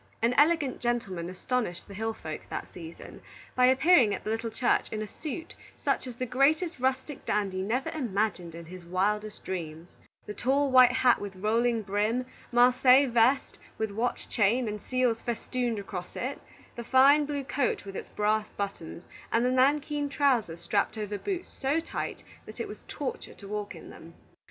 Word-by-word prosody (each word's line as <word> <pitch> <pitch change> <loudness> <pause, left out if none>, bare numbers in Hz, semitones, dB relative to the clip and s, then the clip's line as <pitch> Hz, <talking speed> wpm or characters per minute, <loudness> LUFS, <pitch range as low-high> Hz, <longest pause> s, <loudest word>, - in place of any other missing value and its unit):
An 230 +2 +2
elegant 295 -1 +3
gentleman 195 -8 -2
astonished 190 -1 -3
the 200 - -10
hill 220 +2 -3
folk 155 -1 -6
that - - -6
season, 165 -1 -10 0.3
by 250 0 +4
appearing 260 - +5
at - - -9
the 215 - -2
little 225 +1 -2
church 235 +3 +1
in 215 0 -3
a - - -6
suit 325 - -7 0.3
such - - +1
as 245 - -7
the 255 - -3
greatest 290 +7 +2
rustic 260 +2 -1
dandy 195 -3 -1
never 235 +7 -1
imagined 205 - -2
in 170 0 -9
his 180 +2 -10
wildest 210 +4 -1
dreams, 165 -2 -5 0.4
the 210 - -6
tall 275 +4 +1
white 255 -1 +8
hat 250 -1 +3
with 200 -1 -6
rolling 225 +3 +1
brim, 210 +5 0 0.3
Marseilles 250 +2 +5
vest 240 +4 +2 0.2
with 220 -1 -2
watch 230 +4 -2
chain 230 +3 +2
and 210 -1 -4
seals 250 -3 0
festooned 240 0 -2
across 190 -3 -6
it, 265 +3 -4 0.3
the 235 - -5
fine 275 +5 +5
blue 285 -2 -3
coat 270 -4 -1
with 195 -1 -8
its - - -6
brass 215 +1 0
buttons, 195 -4 -5 0.3
and 230 +1 +2
the 250 - +2
nankeen 290 +3 +2
trousers 245 - +1
strapped 200 +5 0
over 210 -1 -4
boots 370 -3 -3
so 280 +4 -1
tight 330 - -5 0.2
that - - -10
it - - -3
was - - -10
torture 475 - -5
to 200 - -12
walk 210 0 -4
in - - -11
them. - - -13
235 Hz, 175 wpm, -28 LUFS, 205-260 Hz, 0.4 s, white